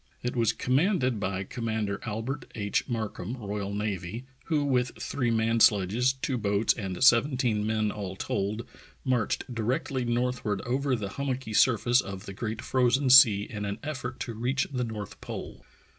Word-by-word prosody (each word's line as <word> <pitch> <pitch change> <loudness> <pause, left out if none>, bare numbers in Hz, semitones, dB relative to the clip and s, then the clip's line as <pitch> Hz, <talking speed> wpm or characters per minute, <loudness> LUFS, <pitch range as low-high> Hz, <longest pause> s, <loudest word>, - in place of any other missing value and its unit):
It 125 +1 -2
was 115 -3 +3
com 130 +1 0
manded 145 - +2
by 95 -1 -2
Commander 110 -2 -3
Albert 115 +6 -4
H. 100 +4 -1
Markham, 110 -1 -3
R.N., 100 0 -3 0.2
who 155 -3 +1
with 125 -3 +1
three 130 -4 -1
man 115 0 +1
sledges, 110 +5 +4
two 130 -1 -2
boats, 100 +1 +2
and 95 0 -4
seventeen 120 -4 +4
men 110 -1 +1
all 100 -3 -5
told 100 +4 -2 0.4
marched 125 -1 0
directly 125 +3 -1
northward 120 -4 -1
over 130 +2 0
the 105 -4 -4
hummocky 130 -4 -3
surface 120 +2 +4
of 95 +1 -8
the 100 - -7
Great 110 +2 -4
Frozen 130 +1 +2
Sea 110 -6 +8
in 105 -1 -6
an 100 0 -3
eff'ort 130 -4 -4
to 115 - -4
reach 125 +5 -1
the 125 -1 0
north 110 -4 -6
pole. - - -7
115 Hz, 160 wpm, -28 LUFS, 105-125 Hz, 0.4 s, Sea